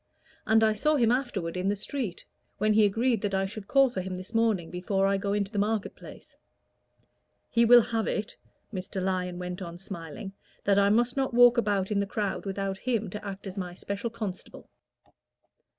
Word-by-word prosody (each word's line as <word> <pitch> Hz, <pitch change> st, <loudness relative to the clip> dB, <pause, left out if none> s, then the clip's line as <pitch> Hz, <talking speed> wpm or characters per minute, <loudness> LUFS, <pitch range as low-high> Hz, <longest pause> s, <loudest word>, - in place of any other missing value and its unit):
And 220 Hz, +1 st, +5 dB
I 215 Hz, -1 st, +4 dB
saw 300 Hz, +9 st, +2 dB
him 235 Hz, -5 st, +3 dB
afterward 210 Hz, -10 st, -1 dB
in 185 Hz, +2 st, 0 dB
the 205 Hz, -, +1 dB
street, 210 Hz, -2 st, -4 dB, 0.3 s
when 215 Hz, +1 st, +2 dB
he 215 Hz, 0 st, +5 dB
agreed 225 Hz, +2 st, +1 dB
that 200 Hz, -2 st, -1 dB
I 190 Hz, 0 st, +1 dB
should 200 Hz, +1 st, -8 dB
call 275 Hz, -2 st, +4 dB
for 190 Hz, -, -3 dB
him 185 Hz, 0 st, -5 dB
this 185 Hz, +4 st, -9 dB
morning 220 Hz, -7 st, +1 dB
before 195 Hz, +2 st, 0 dB
I 195 Hz, 0 st, +2 dB
go 200 Hz, +1 st, -2 dB
into 200 Hz, -1 st, -1 dB
the 205 Hz, -, -2 dB
market 210 Hz, 0 st, -1 dB
place. -, -, -13 dB, 1.2 s
He 235 Hz, 0 st, +4 dB
will 240 Hz, +1 st, +8 dB
have 225 Hz, -1 st, -2 dB
it," 210 Hz, 0 st, -2 dB, 0.4 s
Mr. 190 Hz, 0 st, -4 dB
Lyon 180 Hz, -1 st, -1 dB
went 180 Hz, +1 st, -5 dB
on, 170 Hz, -2 st, -7 dB
smiling, 175 Hz, 0 st, -7 dB, 0.3 s
"that 200 Hz, 0 st, +3 dB
I 200 Hz, 0 st, +4 dB
must 240 Hz, +4 st, +2 dB
not 265 Hz, -3 st, 0 dB
walk 245 Hz, 0 st, +7 dB
about 205 Hz, -3 st, 0 dB
in 205 Hz, -, +1 dB
the 200 Hz, -, 0 dB
crowd 200 Hz, -1 st, -3 dB
without 195 Hz, 0 st, -3 dB
him 225 Hz, -5 st, -1 dB
to 210 Hz, +2 st, -6 dB
act 200 Hz, -1 st, -7 dB
as 195 Hz, 0 st, -5 dB
my 180 Hz, -1 st, -5 dB
special 200 Hz, +5 st, -4 dB
constable." 215 Hz, -5 st, -7 dB
200 Hz, 200 wpm, -28 LUFS, 190-225 Hz, 1.2 s, will